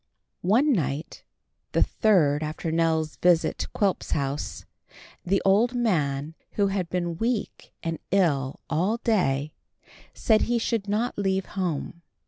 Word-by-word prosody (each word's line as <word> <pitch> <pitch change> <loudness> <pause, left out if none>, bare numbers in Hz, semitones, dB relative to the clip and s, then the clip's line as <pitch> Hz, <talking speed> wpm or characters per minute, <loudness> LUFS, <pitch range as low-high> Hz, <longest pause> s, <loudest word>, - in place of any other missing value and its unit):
One 245 +11 +3
night, 145 - -3 0.5
the - - +4
third 155 -10 +2
after 155 +2 -3
Nell's 160 -1 +1
visit 175 -2 +2
to - - -2
Quilp's 200 -3 -1
house, 140 0 -3 0.6
the 195 +2 +1
old 220 +6 +3
man, 155 - 0 0.2
who 200 -1 +2
had 190 -3 -2
been 175 -1 -2
weak 230 -1 -2
and 165 -1 -3
ill 145 -9 +1
all 180 +8 +1
day, 155 - 0 0.6
said 220 -2 +3
he 240 0 +1
should 225 -3 -1
not 220 +2 -1
leave 190 -1 0
home. 170 -3 -3
180 Hz, 130 wpm, -26 LUFS, 155-210 Hz, 0.6 s, the